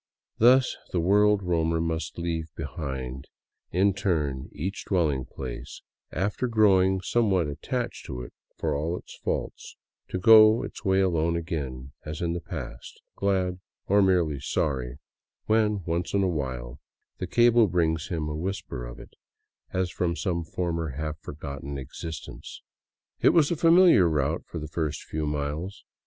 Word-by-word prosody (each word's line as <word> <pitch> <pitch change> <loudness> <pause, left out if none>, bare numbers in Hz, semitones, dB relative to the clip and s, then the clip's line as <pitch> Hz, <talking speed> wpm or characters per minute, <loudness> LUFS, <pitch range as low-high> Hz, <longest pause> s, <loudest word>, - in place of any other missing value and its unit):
Thus 130 +3 +5 0.2
the 90 - 0
world 100 +3 +4
roamer 80 -2 +1
must 80 0 -2
leave 85 -2 -2
behind 65 -3 -5 0.4
in 95 +3 +3
turn 75 -9 -1
each 95 +8 -4
dwelling 75 -9 +1
place, 65 -1 -8 0.3
after 105 +6 -1
growing 95 -4 +4
somewhat 95 -4 +2
attached 70 - -4
to 60 -1 -5
it, - - -11 0.2
for - - -1
all 80 +5 -1
its - - -12
faults, - - -4 0.3
to - - -3
go 110 +3 +7
its - - -8
way 95 -2 +3
alone 85 -3 +1
again 70 -6 -4
as 75 0 -6
in 85 -1 -1
the 85 - -3
past, - - -8 0.2
glad 95 -2 0
— 85 - -56
or 100 +1 +5
merely 85 -7 +2
sorry 65 -2 -2 0.2
— - - -63
when 105 -3 +2
once 85 +3 -1
in 100 - +3
a - - +2
while 65 -6 -3 0.4
the 90 - -3
cable 120 +2 +5
brings 80 -3 0
him 80 -4 -2
a 75 - -3
whisper 85 -6 -4
of - - -10
it, - - -13 0.6
as 95 -2 -1
from 85 -2 -1
some 85 -2 -1
former 80 -3 -3
half 75 0 -4
forgotten 70 -2 -6
existence. 75 +4 -8 0.6
It - - +5
was 160 -3 +4
a - - +2
familiar 165 - +6
route 75 +1 0
for - - -7
the 75 -1 -5
first 80 -1 -3
few 75 -1 -3
miles. 75 +7 -3
85 Hz, 155 wpm, -27 LUFS, 75-95 Hz, 0.6 s, go